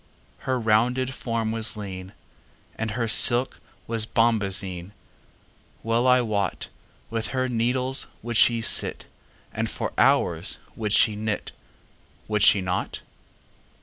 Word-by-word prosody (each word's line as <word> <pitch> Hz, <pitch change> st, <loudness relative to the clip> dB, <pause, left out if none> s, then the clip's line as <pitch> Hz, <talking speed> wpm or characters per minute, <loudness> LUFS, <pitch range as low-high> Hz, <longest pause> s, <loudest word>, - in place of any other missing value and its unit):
Her 130 Hz, -, +1 dB
rounded 125 Hz, +4 st, +1 dB
form 115 Hz, -3 st, -3 dB
was 115 Hz, 0 st, +2 dB
lean, 95 Hz, -2 st, -8 dB, 0.6 s
And 110 Hz, 0 st, -3 dB
her 120 Hz, -, 0 dB
silk 120 Hz, +3 st, +3 dB, 0.3 s
was 115 Hz, -1 st, -3 dB
bombazine:Well 105 Hz, +2 st, -3 dB
I 125 Hz, 0 st, +5 dB
wotWith 110 Hz, +1 st, -5 dB
her 130 Hz, 0 st, 0 dB
needles 125 Hz, +3 st, 0 dB, 0.2 s
would 120 Hz, 0 st, -4 dB
she 115 Hz, 0 st, +4 dB
sit, -, -, +2 dB, 0.5 s
And -, -, -2 dB
for -, -, -4 dB
hours -, -, +2 dB, 0.2 s
would 105 Hz, -2 st, -3 dB
she 110 Hz, -2 st, +4 dB
knit,—Would 105 Hz, 0 st, -6 dB
she 100 Hz, -, +5 dB
not? 90 Hz, 0 st, -3 dB
115 Hz, 110 wpm, -24 LUFS, 105-120 Hz, 0.6 s, I